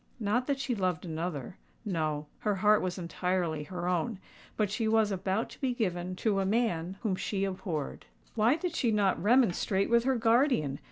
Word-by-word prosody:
Not 230 Hz, +4 st, 0 dB
that 280 Hz, -1 st, 0 dB
she 270 Hz, -2 st, -1 dB
loved 185 Hz, -5 st, -1 dB
another: 160 Hz, -3 st, -4 dB, 0.3 s
no—her 155 Hz, +2 st, -2 dB
heart 210 Hz, +2 st, +4 dB
was 180 Hz, 0 st, -2 dB
entirely 175 Hz, -3 st, -1 dB
her 180 Hz, 0 st, -4 dB
own;—but 190 Hz, +3 st, -3 dB
she 220 Hz, +1 st, -1 dB
was 220 Hz, -1 st, +3 dB
about 195 Hz, +3 st, -1 dB
to -, -, -14 dB
be 255 Hz, -3 st, 0 dB
given 180 Hz, -5 st, -2 dB
to 205 Hz, -3 st, +3 dB
a -, -, +1 dB
man 190 Hz, -4 st, 0 dB
whom 205 Hz, -5 st, +1 dB
she 195 Hz, +1 st, -2 dB
abhorred. 185 Hz, -6 st, -4 dB, 0.3 s
"Why 230 Hz, +5 st, +3 dB
did 335 Hz, +1 st, -3 dB
she 245 Hz, -, +1 dB
not 200 Hz, -5 st, +2 dB
remonstrate 205 Hz, -3 st, +2 dB
with 235 Hz, 0 st, +4 dB
her 265 Hz, 0 st, +3 dB
guardian?" 230 Hz, -, +2 dB
195 Hz, 170 wpm, -30 LUFS, 175-225 Hz, 0.3 s, heart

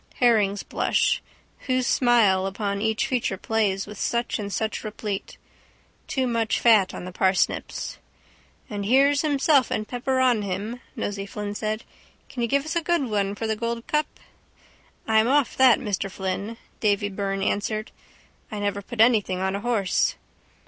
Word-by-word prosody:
Herring's 210 Hz, -5 st, +3 dB
blush. -, -, +1 dB, 0.5 s
Whose 255 Hz, -1 st, +1 dB
smile 220 Hz, -8 st, +3 dB
upon 200 Hz, 0 st, -3 dB
each 220 Hz, +3 st, +1 dB
feature 250 Hz, -7 st, -1 dB
plays 200 Hz, -2 st, 0 dB
with 210 Hz, -1 st, -10 dB
such 235 Hz, -1 st, -1 dB
and 205 Hz, -1 st, -4 dB
such 220 Hz, +2 st, -2 dB
replete. 210 Hz, -2 st, -5 dB, 0.7 s
Too 260 Hz, -1 st, 0 dB
much 230 Hz, -2 st, 0 dB
fat 215 Hz, -5 st, +5 dB
on -, -, -6 dB
the 185 Hz, -, -6 dB
parsnips. 185 Hz, 0 st, 0 dB, 0.7 s
—And 205 Hz, -1 st, -4 dB
here's 280 Hz, +4 st, +4 dB
himself 285 Hz, -3 st, +3 dB
and 215 Hz, -, -2 dB
pepper 260 Hz, +2 st, -1 dB
on 250 Hz, -4 st, +3 dB
him, 205 Hz, +5 st, -4 dB
Nosey 200 Hz, -4 st, -3 dB
Flynn 205 Hz, 0 st, -5 dB
said. 215 Hz, +1 st, -3 dB, 0.5 s
Can 245 Hz, -, -5 dB
you 235 Hz, -, +1 dB
give 280 Hz, +4 st, +1 dB
us 315 Hz, -, -3 dB
a 340 Hz, -, +2 dB
good 330 Hz, -8 st, 0 dB
one 200 Hz, -1 st, 0 dB
for 225 Hz, -, -4 dB
the 220 Hz, 0 st, 0 dB
Gold 230 Hz, +1 st, -3 dB
cup? 300 Hz, 0 st, +1 dB, 1.0 s
—I'm 220 Hz, 0 st, +4 dB
off 280 Hz, 0 st, +2 dB
that, 260 Hz, -3 st, +7 dB
Mr 205 Hz, -5 st, -2 dB
Flynn, 195 Hz, +4 st, -4 dB, 0.2 s
Davy 205 Hz, -1 st, +1 dB
Byrne 195 Hz, 0 st, -2 dB
answered. 215 Hz, +2 st, -1 dB, 0.6 s
I 215 Hz, -, -4 dB
never 205 Hz, 0 st, -2 dB
put 220 Hz, +3 st, -2 dB
anything 215 Hz, -6 st, +3 dB
on 190 Hz, +1 st, -1 dB
a -, -, -2 dB
horse. 215 Hz, -4 st, +1 dB
215 Hz, 160 wpm, -25 LUFS, 200-245 Hz, 1.0 s, that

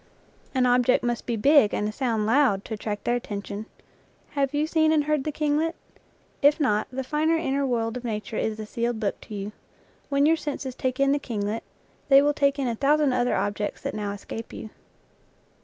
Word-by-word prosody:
An 255 Hz, -1 st, +3 dB
object 250 Hz, 0 st, +3 dB
must 240 Hz, -1 st, -2 dB
be 235 Hz, -, 0 dB
big 275 Hz, -1 st, +5 dB
and 210 Hz, -, -1 dB
a -, -, -2 dB
sound 225 Hz, -3 st, -1 dB
loud, 225 Hz, -4 st, +3 dB
to -, -, -5 dB
attract 210 Hz, -1 st, -4 dB
their 240 Hz, -, +1 dB
attention. 205 Hz, -2 st, -5 dB, 0.6 s
Have 275 Hz, -2 st, 0 dB
you 295 Hz, +1 st, +1 dB
seen 315 Hz, 0 st, +2 dB
and 310 Hz, -2 st, +3 dB
heard 300 Hz, -2 st, 0 dB
the 305 Hz, -, -1 dB
kinglet? 305 Hz, +2 st, 0 dB, 0.7 s
If 290 Hz, +2 st, +5 dB
not, 215 Hz, -8 st, +1 dB
the 265 Hz, +1 st, -3 dB
finer 310 Hz, +4 st, +1 dB
in 325 Hz, -5 st, -1 dB
ner 280 Hz, 0 st, +1 dB
world 230 Hz, -2 st, -1 dB
of 250 Hz, -, -8 dB
nature 215 Hz, -2 st, -4 dB
is 220 Hz, 0 st, -1 dB
a 215 Hz, -, -4 dB
sealed 235 Hz, +1 st, -2 dB
book 205 Hz, -3 st, -2 dB
to 215 Hz, -, -9 dB
you. 200 Hz, +1 st, -4 dB, 0.6 s
When 280 Hz, 0 st, +3 dB
your 325 Hz, +2 st, +4 dB
senses 280 Hz, -4 st, -4 dB
take 255 Hz, +1 st, -2 dB
in 275 Hz, 0 st, +4 dB
the 290 Hz, -, +2 dB
kinglet 215 Hz, -4 st, -3 dB, 0.5 s
they 275 Hz, -1 st, +8 dB
will 295 Hz, 0 st, +3 dB
take 280 Hz, 0 st, +2 dB
in 275 Hz, -2 st, -1 dB
a 235 Hz, -, 0 dB
thousand 285 Hz, +2 st, +2 dB
other 245 Hz, 0 st, +1 dB
objects 205 Hz, 0 st, -2 dB
that -, -, -3 dB
now 210 Hz, -1 st, -3 dB
escape 205 Hz, +3 st, -7 dB
you. 215 Hz, -, -8 dB
250 Hz, 205 wpm, -25 LUFS, 215-290 Hz, 0.7 s, they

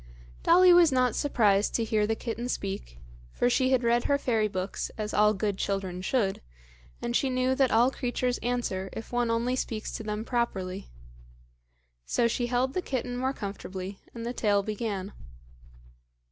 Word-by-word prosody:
Dolly 360 Hz, +1 st, +6 dB
was 345 Hz, -3 st, +6 dB
not 255 Hz, -3 st, +2 dB
surprised 210 Hz, -8 st, +2 dB
to 230 Hz, -, +1 dB
hear 215 Hz, -1 st, +1 dB
the 225 Hz, -, 0 dB
kitten 235 Hz, +2 st, -4 dB
speak, -, -, -4 dB, 0.3 s
for 245 Hz, -, +1 dB
she 260 Hz, +1 st, +2 dB
had 260 Hz, -2 st, +2 dB
read 235 Hz, +1 st, +2 dB
her 280 Hz, -, +3 dB
fairy 225 Hz, -6 st, +1 dB
books, 185 Hz, -1 st, -3 dB
as 215 Hz, -1 st, -3 dB
all 210 Hz, 0 st, +4 dB
good 200 Hz, 0 st, -2 dB
children 190 Hz, -2 st, -2 dB
should, 195 Hz, -1 st, 0 dB, 0.6 s
and 240 Hz, -, -1 dB
she 270 Hz, -, +2 dB
knew 255 Hz, 0 st, +1 dB
that 265 Hz, -1 st, +3 dB
all 235 Hz, +4 st, +4 dB
creatures 250 Hz, -1 st, -1 dB
answer 235 Hz, -6 st, -2 dB
if 225 Hz, -, -7 dB
one 240 Hz, -1 st, +1 dB
only 235 Hz, +2 st, +1 dB
speaks 225 Hz, -4 st, -3 dB
to -, -, -5 dB
them 210 Hz, +1 st, -3 dB
properly. 195 Hz, -6 st, -2 dB, 1.1 s
So 235 Hz, -, +1 dB
she 240 Hz, +1 st, -1 dB
held 250 Hz, +2 st, 0 dB
the 365 Hz, -, -1 dB
kitten 250 Hz, -5 st, -3 dB
more 260 Hz, +2 st, 0 dB
comfortably 195 Hz, -4 st, -6 dB
and 230 Hz, -1 st, -7 dB
the 240 Hz, -, -3 dB
tale 205 Hz, -4 st, +2 dB
began. 205 Hz, -2 st, -4 dB
230 Hz, 170 wpm, -28 LUFS, 205-250 Hz, 1.1 s, Dolly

